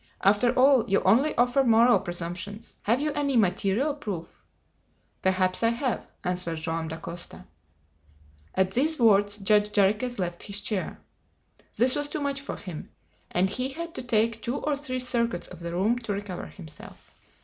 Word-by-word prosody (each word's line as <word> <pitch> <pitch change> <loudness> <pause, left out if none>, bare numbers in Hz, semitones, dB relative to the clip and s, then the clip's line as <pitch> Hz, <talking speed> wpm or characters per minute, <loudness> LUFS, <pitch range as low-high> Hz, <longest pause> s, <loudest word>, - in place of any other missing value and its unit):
After 205 +5 +4
all, 255 -3 +5
you 195 - +2
only 250 +11 +3
offer 245 +3 +3
moral 235 -2 +5
presumptions. 175 +3 -5
Have 235 +5 +2
you 300 0 0
any 280 -3 +1
material 205 +7 +2
proof?" 200 - -5 0.9
"Perhaps 185 -1 +2
I 230 - +4
have," 240 +1 -2 0.2
answered 180 -2 -1
Joam 160 0 -2
Dacosta. 165 +2 -7 1.1
At 190 0 +2
these 300 +9 +2
words, 205 -3 +4
Judge 210 +1 +3
Jarriquez 210 +5 +2
left 175 -2 -3
his 205 0 -4
chair. 205 -3 -3 0.8
This 255 +2 +4
was 290 0 0
too 305 - -4
much 280 -1 -2
for 280 - -5
him, 175 -5 -8 0.4
and 180 +2 +2
he 255 +7 -1
had 335 +4 -6
to - - -5
take 230 -2 +1
two 240 - -2
or 295 0 -1
three 265 -3 -3
circuits 235 -5 -1
of - - -11
the 170 0 -5
room 205 +8 +1
to 225 -4 -3
recover 200 -3 -5
himself. 160 -5 -12
215 Hz, 160 wpm, -27 LUFS, 185-255 Hz, 1.1 s, all